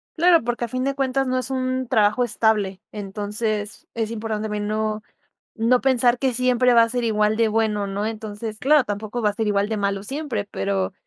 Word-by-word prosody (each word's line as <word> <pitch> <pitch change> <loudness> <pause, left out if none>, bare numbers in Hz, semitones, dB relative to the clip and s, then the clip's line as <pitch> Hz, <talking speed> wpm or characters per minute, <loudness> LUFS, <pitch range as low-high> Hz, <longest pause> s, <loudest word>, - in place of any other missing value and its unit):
Claro, 335 -3 +5
porque 240 0 -2
a - - -7
fin 255 +2 -3
de 275 0 -1
cuentas 270 -1 0
no 255 0 0
es 255 +1 -3
un 255 -1 -1
trabajo 215 +3 +3
estable. 210 -4 0
Entonces 210 +1 -4
es 225 -1 -2
importante 220 -1 -3
también 210 -1 -3
no, 215 0 -2 0.5
no 240 +2 +2
pensar 250 -2 +3
que 260 -3 0
siempre 250 0 +3
va 230 - +7
a 230 - +2
ser 245 0 -1
igual 215 -1 +2
de 230 -1 +3
bueno 210 -2 0
¿no? 200 +2 -3
Entonces, 215 0 -5
claro, 290 0 +4
tampoco 215 +3 -4
va 210 - +3
a - - -5
ser 220 +1 -2
igual 205 0 +1
de 220 - 0
malo 200 -1 -1
siempre, 265 -4 -3
pero, 195 -1 -1
220 Hz, 205 wpm, -23 LUFS, 210-250 Hz, 0.5 s, va